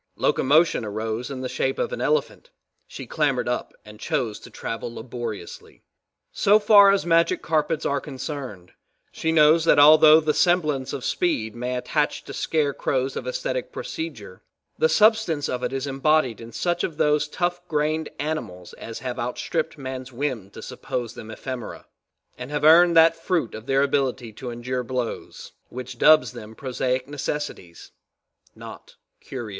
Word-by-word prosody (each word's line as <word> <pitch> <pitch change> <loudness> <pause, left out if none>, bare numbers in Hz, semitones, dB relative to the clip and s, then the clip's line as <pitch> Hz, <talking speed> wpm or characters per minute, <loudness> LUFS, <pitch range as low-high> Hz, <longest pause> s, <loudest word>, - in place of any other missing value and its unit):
Locomotion 155 -1 +2
arose 110 +3 -4
in 135 -2 -6
the 130 - -3
shape - - -2
of - - -2
an - - -4
elephant, 475 +1 -1 0.4
she - - -9
clambered 140 -6 0
up 125 - -2
and 105 0 -13
chose 125 -7 -2
to - - -13
travel 115 +1 -5
laboriously. 115 -5 -8 0.5
So 205 +2 +4
far 205 -1 +7
as 195 -2 +2
magic 170 0 +2
carpets 155 0 0
are 140 0 0
concerned, 130 - -7 0.4
she 160 - -2
knows 155 +1 +5
that - - +5
although 155 +1 +8
the 155 -1 0
semblance 155 -8 +1
of 130 - -5
speed 110 -12 -1
may 125 +1 -3
attach 125 - -1
to - - -9
scarecrows 140 -3 -1
of - - -5
aesthetic - - -3
procedure, 330 0 -7 0.3
the 475 - +2
substance 215 - +3
of 125 - -3
it 125 0 -2
is 135 +1 -3
embodied 135 -3 +1
in 115 0 -10
such 175 +5 -1
of 155 - -3
those 150 -1 +2
tough 175 +3 -2
grained 155 0 -1
animals 140 - -5
as 115 0 -8
have 125 -1 -5
outstripped 155 +7 -3
man's 130 -1 -7
whim 125 -6 -3
to - - -11
suppose 120 -2 -5
them 110 - -10
ephemera, 120 +1 -7 0.5
and 125 +1 -7
have 150 0 -3
earned 170 +2 +6
that 165 0 +6
fruit 165 - -2
of 110 +3 -9
their 135 0 +3
ability 130 -5 -1
to 125 +4 -7
endure 125 +2 -4
blows, 125 -1 -5 0.2
which 125 0 -8
dubs 155 -7 +5
them 110 +1 -11
prosaic 130 0 -2
necessities 145 - -6 0.6
not - - -12 0.2
curios. 120 -5 -7
135 Hz, 160 wpm, -24 LUFS, 125-160 Hz, 0.6 s, although